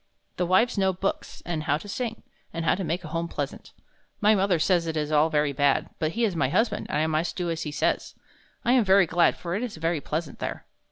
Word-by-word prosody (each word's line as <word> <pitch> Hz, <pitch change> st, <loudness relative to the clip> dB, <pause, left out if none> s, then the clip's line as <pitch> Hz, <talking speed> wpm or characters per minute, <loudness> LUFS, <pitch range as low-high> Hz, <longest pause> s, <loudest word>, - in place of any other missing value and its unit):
The 180 Hz, -, 0 dB
wives 200 Hz, +4 st, +3 dB
know 190 Hz, -1 st, +2 dB
books, 190 Hz, +2 st, -4 dB
and 160 Hz, -3 st, -3 dB
how 150 Hz, -1 st, +2 dB
to 185 Hz, -, -11 dB
sing, 230 Hz, +2 st, -4 dB, 0.3 s
and 165 Hz, 0 st, -4 dB
how -, -, +4 dB
to 190 Hz, -, -2 dB
make 170 Hz, +2 st, -2 dB
home 165 Hz, +2 st, -3 dB
pleasant. -, -, -5 dB, 0.5 s
My 210 Hz, +1 st, +5 dB
mother 195 Hz, -3 st, +2 dB
says 170 Hz, +1 st, +2 dB
it 160 Hz, -1 st, -2 dB
is 150 Hz, 0 st, -2 dB
all 155 Hz, +1 st, +4 dB
very 150 Hz, -2 st, +1 dB
bad, 140 Hz, 0 st, +1 dB
but 155 Hz, +1 st, -1 dB
he 235 Hz, -, -1 dB
is 205 Hz, -6 st, +1 dB
my 140 Hz, -5 st, +1 dB
husband, 225 Hz, -, 0 dB
and -, -, 0 dB
I 155 Hz, -, +2 dB
must 160 Hz, +2 st, -1 dB
do 175 Hz, -2 st, -2 dB
as 165 Hz, 0 st, -3 dB
he 150 Hz, -, -4 dB
says. 145 Hz, -, -1 dB, 0.5 s
I 240 Hz, -, +3 dB
am 250 Hz, -2 st, +5 dB
very 195 Hz, -1 st, +5 dB
glad; 170 Hz, +1 st, +3 dB
for 170 Hz, -1 st, -5 dB
it 200 Hz, -, -1 dB
is 245 Hz, -8 st, -4 dB
very 165 Hz, -1 st, -1 dB
pleasant 155 Hz, 0 st, -4 dB
there." -, -, -5 dB
170 Hz, 240 wpm, -26 LUFS, 155-195 Hz, 0.5 s, My